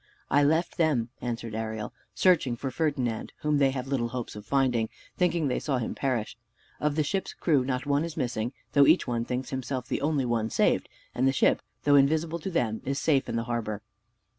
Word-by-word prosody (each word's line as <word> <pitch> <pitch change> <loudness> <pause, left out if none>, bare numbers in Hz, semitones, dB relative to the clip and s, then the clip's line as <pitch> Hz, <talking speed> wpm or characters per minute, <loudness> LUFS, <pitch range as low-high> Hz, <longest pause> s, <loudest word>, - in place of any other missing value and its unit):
"I 145 +2 +5
left 160 +4 +1
them," 145 -8 +2
answered 115 -2 -4
Ariel, 110 -1 -4 0.2
"searching 160 -10 +3
for 130 +3 -4
Ferdinand, 130 -7 -1
whom, 150 -1 +2
they 135 -1 +5
have 130 -1 -3
little 130 -4 0
hopes 120 -2 -5
of 105 0 -9
finding, 125 -5 +2 0.3
thinking 170 -4 +1
they 130 - 0
saw 140 -4 -1
him 120 - -2
perish. 125 -6 -1 0.4
Of 150 -1 0
the 155 - +2
ship's 190 +6 -2
crew 145 -6 +2
not 130 +1 -2
one 145 +1 +2
is 165 -1 -5
missing; 120 -4 -1 0.2
though 140 -1 +6
each - - +5
one 120 -1 -1
thinks 125 +1 -3
himself 130 -1 -3
the - - -2
only 145 -3 +1
one 115 -2 0
saved: - - +2 0.2
and 130 +2 +2
the - - +4
ship, 135 - +3 0.2
though 145 - +4
invisible 155 +4 +3
to 180 - -4
them, 115 -11 0
is 140 +1 -2
safe 140 -4 +2
in - - -2
the 115 - 0
harbor." 115 -3 -3
130 Hz, 205 wpm, -28 LUFS, 120-150 Hz, 0.4 s, though